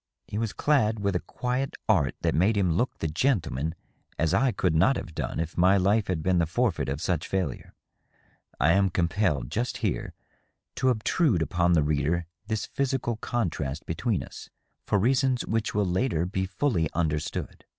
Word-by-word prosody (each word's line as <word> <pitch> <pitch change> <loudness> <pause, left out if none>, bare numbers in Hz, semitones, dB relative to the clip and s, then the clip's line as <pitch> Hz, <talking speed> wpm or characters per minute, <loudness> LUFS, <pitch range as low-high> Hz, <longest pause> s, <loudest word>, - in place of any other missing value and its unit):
He 105 - -4
was 115 -2 -1
clad 110 -8 +2
with 100 -2 0
a - - +2
quiet 125 +6 -3
art 70 -1 +2
that - - +1
made 100 +6 +3
him 90 -4 +2
look 120 +10 0
the 80 - -2
gentleman 80 - 0 0.4
as 80 -1 +1
I 135 -1 +3
could 90 -5 0
not 95 +13 +4
have 85 - -6
done - - -3
if 80 0 -3
my 95 +3 +5
life 100 +3 +2
had 80 -4 -1
been 90 -1 +2
the 85 - +2
forfeit 105 - 0
of 70 +1 -2
such 85 -1 -1
failure. 95 -2 -3 0.8
I 75 +5 +4
am 95 +1 +3
compelled, 85 - 0
just 120 +3 -1
here, - - -2 0.6
to 130 - +2
obtrude 115 - +2
upon 85 +1 +1
the 80 -3 +4
reader 75 +3 0 0.2
this 110 -1 -1
physical 130 -4 -1
contrast 80 - -2
between 100 +4 -1
us, - - -11 0.4
for - - +2
reasons 130 +4 +2
which 110 -2 -1
will 105 -1 +2
later 90 -2 0
be 95 +1 -2
fully 95 - 0
understood. 75 -2 -2
95 Hz, 175 wpm, -27 LUFS, 80-115 Hz, 0.8 s, my